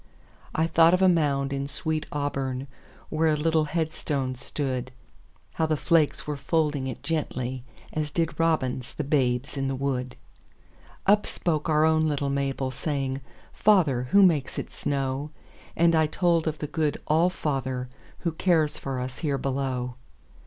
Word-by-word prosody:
I 160 - +3
thought 165 +1 +5
of 185 - +1
a - - +7
mound 140 -5 +2
in 140 0 -2
sweet 160 0 -2
AuburnWhere 135 -2 -2 0.7
a - - -5
little 160 0 +2
headstone 150 -4 -2
stood; 130 -1 -3 0.6
How 160 - 0
the 155 -1 +1
flakes 160 -1 +2
were 150 - -2
folding 150 -2 0
it 130 - -6
gently, 130 -6 -2 0.3
As 155 -1 -1
did 165 +2 -1
robins 135 -6 0
the 150 - -2
babes 135 -1 0
in 135 0 0
the 135 - -1
wood. 130 -2 -2 0.9
Up 205 +1 +4
spoke 160 -2 -1
our 155 0 +4
own 160 0 +3
little 140 -1 -1
Mabel, 135 -1 -1
Saying, 135 -1 -2 0.3
"Father, 155 - +3
who 200 +5 +6
makes 160 -8 +2
it - - -4
snow?"And 145 +4 -2
I 160 -1 +4
told 170 0 +1
of 155 -1 -1
the 150 - -4
good 150 0 -1
All 165 +4 +3
fatherWho 135 0 -4
cares 160 -5 +2
for 135 -2 -3
us 130 +1 -5
here 145 -4 0
below. 130 -2 -2
145 Hz, 150 wpm, -26 LUFS, 135-160 Hz, 0.9 s, a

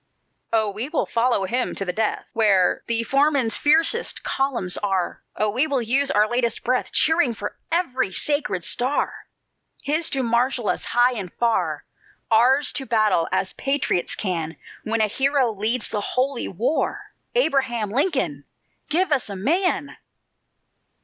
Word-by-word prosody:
"Oh, 220 -2 +1
we 220 +7 -4
will 305 - 0
follow 235 -4 +1
him 245 +6 -1
to 195 - -3
the 180 - -2
death, 220 +2 -1
Where 195 -5 +3
the 230 0 +2
foeman's 275 -2 +2
fiercest 325 +10 +2
columns 255 -10 -1
are! 190 -3 -2
Oh, 215 -1 0
we 255 +8 +1
will 280 -3 0
use 270 +5 +2
our 210 -2 +3
latest 240 -1 -1
breath, 255 +1 0
Cheering 315 -7 +2
for 205 0 -6 0.2
every 260 - 0
sacred 245 - -2
star! 255 +4 -1 0.6
His 310 +3 0
to 270 -1 -1
marshal 240 0 +1
us - - -1
high 245 +1 +3
and 195 -7 -6
far; 235 -1 0 0.5
Ours 255 +6 +4
to 270 -2 -4
battle, 215 -7 +2
as 190 - -1
patriots 275 -10 0
can 170 -5 -3 0.3
When 225 +1 0
a - - +5
Hero 270 +2 +1
leads 220 +3 -1
the 210 - -2
Holy 255 +4 -1
War! 240 - -2 0.2
Abraham 260 - +1
Lincoln, 220 - -1 0.4
give 355 +2 +1
us 270 -6 +1
a 200 - -5
MAN!" 300 - 0
240 Hz, 150 wpm, -23 LUFS, 210-275 Hz, 0.6 s, a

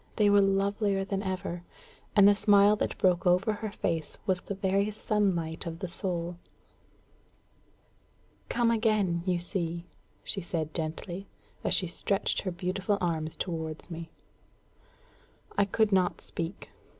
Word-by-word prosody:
They 210 -2 +4
were 205 0 +6
lovelier 195 0 +1
than 195 -1 -2
ever. 185 -3 -3 0.5
And 200 -2 +8
the 205 - +8
smile 205 0 +5
that - - -2
broke 180 -1 +2
over 185 +5 +3
her 210 0 -5
face 165 -6 -2
was 185 -2 +1
the 200 - -5
very 195 +1 +1
sunlight 190 -7 -1
of 165 0 -4
the 185 +1 -4
soul. 175 -1 -3 2.1
"Come 235 -1 +2
again, 215 -6 +2
you 180 -1 +2
see!" 170 -1 -2 0.4
she 195 - -2
said 160 -3 -3
gently, 170 +4 -4 0.4
as - - +3
she 185 - +2
stretched 195 +3 0
her 185 - -2
beautiful 185 +3 -1
arms 160 -3 -1
towards 160 -1 -4
me. 165 0 -6 1.5
I 200 - +4
could 215 +2 +2
not 185 -2 +2
speak. 170 +2 -6
190 Hz, 140 wpm, -29 LUFS, 170-200 Hz, 2.1 s, And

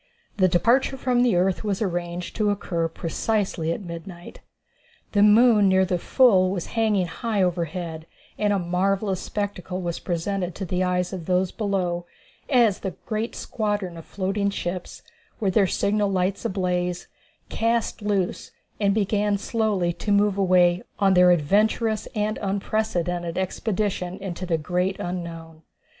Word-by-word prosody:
The 185 -2 +5
departure 240 +10 +2
from 250 -1 +1
the 245 -6 +3
earth 185 +3 +1
was 200 -3 -1
arranged 175 -3 -3
to 215 -2 +2
occur 175 -5 -1
precisely 170 0 -2
at 185 - -4
midnight. 170 0 -9 0.7
The 205 - +2
moon 210 -1 +6
near 190 0 +4
the 180 -1 -1
full 195 -5 +4
was 185 -3 -3
hanging 215 -5 +2
high 210 +3 -1
over 175 -1 +1
head, 165 -1 -6 0.3
and 210 -1 +1
a 200 - +2
marvellous 190 +2 0
spectacle 195 -3 -4
was 175 -2 -3
presented 180 0 -2
to 195 - -4
the 180 +1 -1
eyes 180 0 0
of 175 -4 -6
those 185 0 +1
below 180 -5 -2 0.4
as 235 -7 +4
the 190 -4 -5
great 220 +1 -3
squadron 205 -5 -2
of 165 - -9
floating 200 +2 -1
ships, 180 -2 -5 0.4
with 195 -4 0
their 200 -3 +4
signal 205 +2 +1
lights 190 0 -1
ablaze, 180 -2 -1 0.4
cast 230 0 0
loose 200 -3 -1 0.3
and 200 -1 +2
began 205 -1 +1
slowly 205 -5 0
to 205 - -4
move 205 0 +3
away 180 -2 +3 0.2
on 195 -1 +3
their 180 -1 +6
adventurous 210 +6 +2
and 210 0 -1
unprecedented 185 -4 -1
expedition 190 -1 -2
into 185 -2 -5
the 165 -2 +1
great 180 +4 -1
unknown. 165 -2 -6
190 Hz, 150 wpm, -24 LUFS, 175-210 Hz, 0.7 s, moon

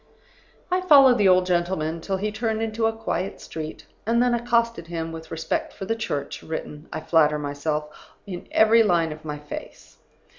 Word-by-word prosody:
"I 365 +1 +2
followed 275 -8 +7
the 200 - +5
old 185 -1 +5
gentleman 175 -2 -1
till 190 +3 -2
he 210 +2 -2
turned 220 0 -1
into 225 0 0
a - - +1
quiet 195 -4 -3
street, 155 -1 -7 0.2
and 230 +2 +1
then 245 0 +3
accosted 235 -6 0
him, 165 -1 -4
with 160 0 -9
respect 315 - -2
for 195 - -7
the 225 - -1
Church 145 -11 -4
written 155 -1 -6
(I - - -4
flatter 155 -2 +3
myself) 150 +1 -2 0.4
in 180 -4 -7
every 220 +1 +6
line 170 -6 +2
of 155 +1 -9
my 150 -1 -5
face. 145 - -10
180 Hz, 180 wpm, -24 LUFS, 160-225 Hz, 0.4 s, followed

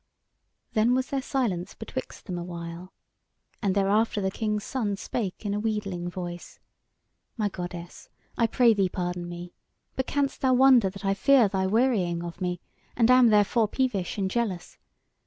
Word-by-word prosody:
Then 225 +3 +3
was 260 +1 -1
there 275 -1 0
silence 235 -11 -2
betwixt - - -7
them 180 -3 -4
a - - -4
while, 170 +1 -7 0.7
and 200 -3 +1
thereafter 205 +2 +2
the 190 -1 -1
King's 210 0 -2
Son 210 -7 -2
spake 195 +1 -4
in 200 - -1
a 205 - -1
wheedling 200 -5 -2
voice: 175 -1 -7 0.8
"My 210 -2 0
goddess, 175 -2 -8 0.3
I 230 - +2
pray 235 -1 +4
thee 195 -3 +1
pardon 175 -1 -3
me! 175 0 -8 0.4
But 260 - -2
canst 280 -1 -1
thou 260 -1 +3
wonder 255 -5 +6
that 195 +2 -9
I 195 - +3
fear 250 +3 +5
thy 190 -1 -1
wearying 195 -6 +1
of 175 +1 -8
me, 180 -1 -2 0.3
and 235 +1 +4
am 255 -1 +7
therefore 215 +1 +3
peevish 215 -7 -1
and 195 -2 0
jealous? 195 -7 -3
200 Hz, 165 wpm, -27 LUFS, 180-235 Hz, 0.8 s, am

